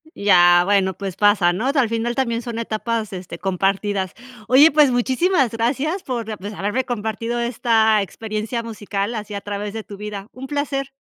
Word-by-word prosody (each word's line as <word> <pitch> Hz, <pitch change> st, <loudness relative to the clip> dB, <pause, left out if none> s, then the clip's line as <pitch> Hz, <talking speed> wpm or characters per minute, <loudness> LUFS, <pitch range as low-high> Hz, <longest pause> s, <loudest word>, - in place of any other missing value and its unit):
Ya, 175 Hz, -3 st, +5 dB
bueno, 190 Hz, -1 st, +2 dB
pues 195 Hz, -3 st, -5 dB
pasa, 205 Hz, -4 st, +3 dB
¿no?, 225 Hz, +9 st, -1 dB
o -, -, +3 dB
sea, 280 Hz, -2 st, +3 dB
al 230 Hz, -, 0 dB
final 230 Hz, +1 st, -1 dB
también 235 Hz, -3 st, 0 dB
son 235 Hz, -1 st, -6 dB
etapas, 220 Hz, -1 st, -3 dB
este, 180 Hz, -2 st, -7 dB
compartidas. 195 Hz, +1 st, -1 dB, 0.3 s
Oye, 280 Hz, +5 st, +7 dB
pues 295 Hz, -2 st, +5 dB
muchísimas 260 Hz, -, +2 dB
gracias 275 Hz, +10 st, -1 dB
por, 230 Hz, -4 st, -4 dB
pues, 205 Hz, +3 st, -6 dB
haberme 210 Hz, +6 st, -1 dB
compartido 230 Hz, +1 st, -3 dB
esta 225 Hz, -2 st, +2 dB
experiencia 215 Hz, +3 st, -4 dB
musical 205 Hz, -1 st, -4 dB
así 210 Hz, -1 st, -6 dB
a 200 Hz, -, -4 dB
través 205 Hz, 0 st, -5 dB
de 220 Hz, -1 st, -5 dB
tu 200 Hz, -, -10 dB
vida. 210 Hz, -1 st, -6 dB
Un 265 Hz, +1 st, -9 dB
placer. 280 Hz, -1 st, -2 dB
220 Hz, 180 wpm, -21 LUFS, 200-245 Hz, 0.3 s, Oye